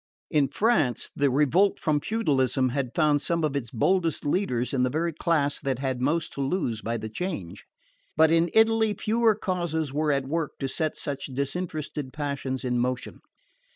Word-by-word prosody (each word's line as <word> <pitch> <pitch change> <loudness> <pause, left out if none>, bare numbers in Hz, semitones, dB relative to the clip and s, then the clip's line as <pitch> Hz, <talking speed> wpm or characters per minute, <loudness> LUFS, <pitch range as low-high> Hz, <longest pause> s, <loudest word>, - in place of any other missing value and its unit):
In 145 -3 +3
France, 170 - +1
the 140 0 +2
revolt 150 +9 +3
from 150 -2 +1
feudalism 140 - +1
had 130 -1 -3
found 150 -3 +3
some 170 0 -1
of 150 -2 0
its 125 -5 -2
boldest 165 +7 +1
leaders 145 -7 0
in 130 - +1
the 125 - +2
very 165 +4 -1
class 150 -3 0
that 135 -3 -2
had 130 -1 -2
most 155 +5 0
to 140 - -4
lose 135 - -1
by 115 +1 -2
the 110 - -5
change; 110 - -5 0.5
but 160 0 +5
in 165 +1 +3
Italy 220 -1 +4
fewer 225 0 +2
causes 170 -7 -2
were 150 +1 +1
at 140 -1 0
work 160 +1 -2
to 135 - -2
set 155 +3 -2
such 140 -1 -4
disinterested 145 0 -4
passions 140 -3 -3
in 125 -1 0
motion. 125 +1 -2
145 Hz, 175 wpm, -26 LUFS, 130-170 Hz, 0.5 s, but